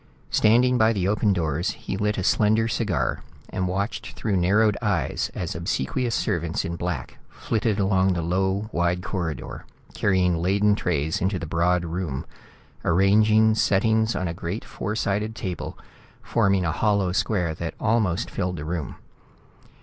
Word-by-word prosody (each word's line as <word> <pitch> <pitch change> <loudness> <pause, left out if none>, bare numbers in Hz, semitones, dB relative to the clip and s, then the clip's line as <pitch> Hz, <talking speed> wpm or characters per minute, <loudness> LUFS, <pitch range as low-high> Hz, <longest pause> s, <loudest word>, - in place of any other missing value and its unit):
Standing 125 +3 +4
by 110 +1 +4
the 95 -3 0
open 105 +1 +2
doors, 85 0 0
he - - -5
lit 105 +2 0
a 95 - -1
slender 110 +3 +3
cigar 100 - -1 0.3
and 95 -1 -2
watched 100 +4 -3
through 105 -3 -2
narrowed 100 +4 +3
eyes 95 - 0
as 90 - -3
obsequious 85 - -1
servants 85 -1 -1
in 85 - -3
black 85 -6 -4
flitted 110 -2 -1
along 95 -2 +2
the 85 -2 -2
low 95 +4 0
wide 85 +1 0
corridor, 85 -8 -4 0.3
carrying 90 -3 +2
laden 100 +4 +3
trays 80 -6 -1
into 95 +2 0
the 85 - -5
broad 85 +2 +1
room, 80 -5 -3 0.6
arranging 105 +4 +4
settings 110 +2 +2
on 90 - -1
a 85 - -3
great 85 +5 -5
four 105 - -4
sided 105 +1 -1
table 90 -5 -5 0.5
forming 95 -2 +2
a 80 - +1
hollow 100 +1 +1
square 90 -3 0
that 80 +1 -5
almost 110 -6 +1
filled 90 0 -2
the 75 -2 -6
room. 80 -2 -4
95 Hz, 150 wpm, -24 LUFS, 85-105 Hz, 0.6 s, Standing